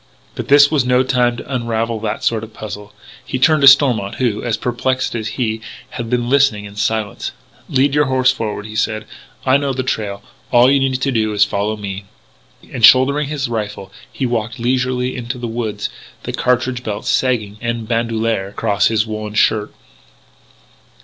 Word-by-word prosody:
But - - -6
this 145 +1 +6
was 150 -5 +2
no 125 +1 +3
time 125 -2 +1
to 140 - -7
unravel 115 -2 -1
that 110 -1 -4
sort 110 -2 0
of 110 0 -11
puzzle. 105 -1 -8 0.3
He - - -3
turned 155 +3 +3
to 140 - +6
Stormont 125 -8 +5
who, 120 -5 -1
as 115 -2 -1
perplexed 130 +2 -1
as 110 -2 -3
he, 110 -3 -1 0.3
had 120 -2 -5
been 120 -1 0
listening 130 -6 +2
in 100 0 -11
silence. 110 -1 -2 0.4
"Lead 135 +1 +2
your 150 0 +3
horse 130 -2 +3
forward," 105 -2 -4
he 110 0 -9
said. 110 -1 -1 0.4
"I 130 +1 +5
know 140 -1 -1
the 130 0 -2
trail. 105 -6 -3 0.3
All 125 +2 +5
you 140 - +4
need 130 -1 0
do 115 -5 0
is 105 0 +4
to 105 - -1
follow 105 +2 -1
me." 100 -1 -6 0.7
And, 120 - -5
shouldering 130 +5 +6
his 145 -1 -2
rifle, 105 -4 -5 0.2
he 135 - -3
walked 115 -2 -2
leisurely 125 +1 -1
into 125 0 -5
the 120 - -5
woods, 110 -3 -3 0.4
the - - -5
cartridge 125 0 0
belt 105 -4 -5
sagging 110 -5 0
en 115 -1 -3
bandouliere 115 -3 -1
across 100 0 +1
his 110 -1 +1
woollen 110 -1 -5
undershirt. 105 0 +2
120 Hz, 180 wpm, -18 LUFS, 110-130 Hz, 0.7 s, this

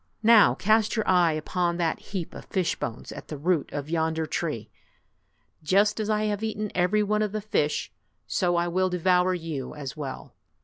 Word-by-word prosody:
Now 225 -1 +7
cast 215 +2 +2
your 220 - -1
eye 175 -3 +4
upon 170 +3 -1
that 170 -2 0
heap 185 -5 -6
of - - -9
fish 185 -3 -1
bones 115 - -6
at - - -9
the 155 - -6
38 145 +2 -12
root 175 -5 +1
of 145 -1 -4
yonder 160 -1 0
tree. 130 -10 -3 0.9
Just 200 +7 +2
as 215 0 -2
I 215 0 +1
have 210 -1 -1
eaten 215 -1 -3
every 185 +4 +2
one 210 +1 0
of 210 -1 -1
the 215 - -1
fish, 175 -8 -1 0.3
so 175 -2 0
I 170 0 +1
will 185 +2 +1
devour 180 +1 +2
you 160 -7 -5
as 140 -3 -6
well!" 140 -3 -7
180 Hz, 190 wpm, -26 LUFS, 160-210 Hz, 0.9 s, Now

